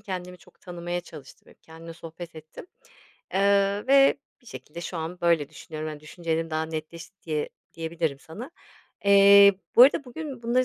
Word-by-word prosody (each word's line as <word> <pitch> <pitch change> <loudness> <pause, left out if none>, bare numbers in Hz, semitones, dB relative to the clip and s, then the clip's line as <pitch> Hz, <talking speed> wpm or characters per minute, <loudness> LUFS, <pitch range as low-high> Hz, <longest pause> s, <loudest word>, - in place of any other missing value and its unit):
Kendimi 180 -3 -7
çok - - -23
tanımaya 175 0 -5
çalıştım, 150 -5 -14
hep - - -24
kendimle 165 +1 -11
sohbet 165 +1 -10
ettim. 155 - -12 0.7
Eee, 200 +1 +2
ve 275 +1 +5 0.2
bir 245 - -27
şekilde 150 - -10
şu 175 - -6
an 165 +2 -5
böyle 170 -4 +2
düşünüyorum, 155 0 -7
hani, 150 -1 -9
düşüncelerim 165 +1 -3
daha 155 0 -1
netleşti 160 +4 -8
diye 155 -2 -2 0.3
diyebilirim 160 -3 -3
sana. 200 - -10 0.5
Eee, 200 0 +7 0.2
bu 240 - +10
arada 275 +2 +5
bugün 265 -1 -8
bunları 245 +2 +2
170 Hz, 160 wpm, -26 LUFS, 160-200 Hz, 0.7 s, bu